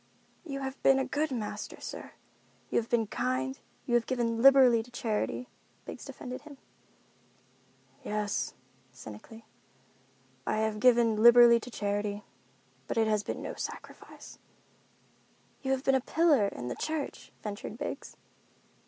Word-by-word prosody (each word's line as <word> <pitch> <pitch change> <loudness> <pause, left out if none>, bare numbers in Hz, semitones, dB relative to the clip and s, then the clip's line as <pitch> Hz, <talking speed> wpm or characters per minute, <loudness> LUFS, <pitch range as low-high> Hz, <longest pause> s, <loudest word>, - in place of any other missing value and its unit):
"You 275 -5 -5
have 265 0 -5
been 270 - +5
a 265 - +1
good 305 +2 -1
master, 235 -6 -5
sir. - - -8 0.6
You - - +3
have 230 - -6
been 235 -2 +2
kind, 130 -6 -2 0.3
you 240 - -2
have 240 -1 +3
given 230 -3 0
liberally 260 -3 +7
to 230 - -13
charity," 240 +1 -2 0.4
Biggs - - -8
defended 250 0 -7
him. 290 -2 -13 1.5
"Yes," 210 -1 -2 0.4
cynically, 125 - -11 1.0
"I - - +1
have 220 -1 0
given 230 -2 +4
liberally 235 0 +8
to 240 - -9
charity. 205 -2 -2 0.6
But - - -3
it 225 - +4
has 215 -1 +2
been - - -5
no - - -4
sacrifice." - - -9 1.2
"You 265 - -4
have 265 0 0
been 270 - +3
a 265 - +3
pillar 295 -7 +3
in 125 -10 -6
the 120 - -3
church," 310 -3 -4
ventured 210 +1 -6
Biggs. 290 - -6
235 Hz, 140 wpm, -30 LUFS, 210-265 Hz, 1.5 s, liberally